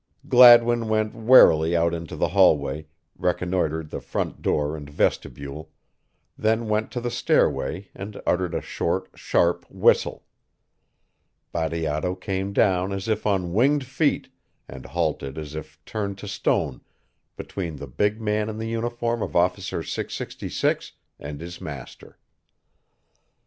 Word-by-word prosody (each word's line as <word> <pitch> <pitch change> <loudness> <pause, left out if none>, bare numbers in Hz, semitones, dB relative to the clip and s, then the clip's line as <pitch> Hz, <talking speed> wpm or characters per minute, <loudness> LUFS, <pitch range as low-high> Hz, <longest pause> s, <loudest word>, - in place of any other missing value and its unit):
Gladwin 120 -2 +7
went 110 0 +1
warily 85 -9 +6
out 85 0 +2
into 85 -1 -5
the - - 0
hallway, 75 +3 +3 0.3
reconnoitered 90 -3 -1
the - - -5
front - - -4
door 75 +1 0
and 75 -2 -9
vestibule, 70 +1 -2 0.7
then 110 +1 0
went 105 +1 0
to 125 - -2
the 120 0 -3
stairway 95 -3 +1
and 100 +2 -8
uttered 90 -1 0
a - - -1
short, 95 +3 -2
sharp 85 0 +1
whistle. - - +2 1.3
Bateato 80 +1 -1
came 95 +1 -3
down 95 -2 +2
as 95 +1 -4
if 110 -1 -1
on 90 -4 0
winged 135 +6 +3
feet 140 +4 0 0.4
and - - -10
halted 70 +1 -2
as 75 -2 -6
if 75 0 -8
turned 100 -3 -4
to 100 - -9
stone 100 +1 -1 0.6
between 85 -5 -5
the 70 - -7
big 105 - -1
man 105 0 -1
in 110 - -5
the 110 0 -4
uniform 120 0 -2
of - - -4
Officer 90 +1 0
666 - - -3 0.3
and 75 0 -7
his 85 +1 -8
master. 70 -5 -9
95 Hz, 135 wpm, -24 LUFS, 80-110 Hz, 1.3 s, Gladwin